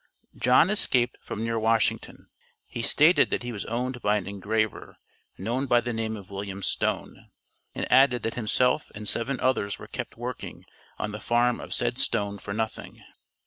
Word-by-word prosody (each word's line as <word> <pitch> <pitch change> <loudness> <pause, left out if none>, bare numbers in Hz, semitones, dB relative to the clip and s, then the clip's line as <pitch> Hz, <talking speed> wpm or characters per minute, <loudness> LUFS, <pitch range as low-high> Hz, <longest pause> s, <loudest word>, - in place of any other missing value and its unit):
John 130 +9 +4
escaped 125 -12 +1
from 110 - -5
near 115 0 0
Washington. 115 0 0 0.4
He 115 - -5
stated 155 +9 +5
that - - -1
he 120 - -4
was 105 -3 -5
owned 125 +2 -3
by 105 +1 +2
an 100 - -4
engraver, 105 +2 -2 0.4
known 120 +7 -2
by 120 -1 +5
the 120 0 -3
name 110 -1 -2
of 100 -1 -12
William 100 0 -5
Stone, - - -2 0.5
and - - -3
added 130 -2 +5
that 115 - -1
himself 125 +5 +1
and 105 0 -5
seven 125 +6 0
others 115 -6 0
were - - -10
kept - - -6
working - - -6 0.3
on 105 - -3
the 105 - -6
farm 120 +3 +2
of - - -9
said 120 +1 0
Stone 100 -3 0
for - - -7
nothing. 110 +1 -4
115 Hz, 175 wpm, -27 LUFS, 105-125 Hz, 0.5 s, stated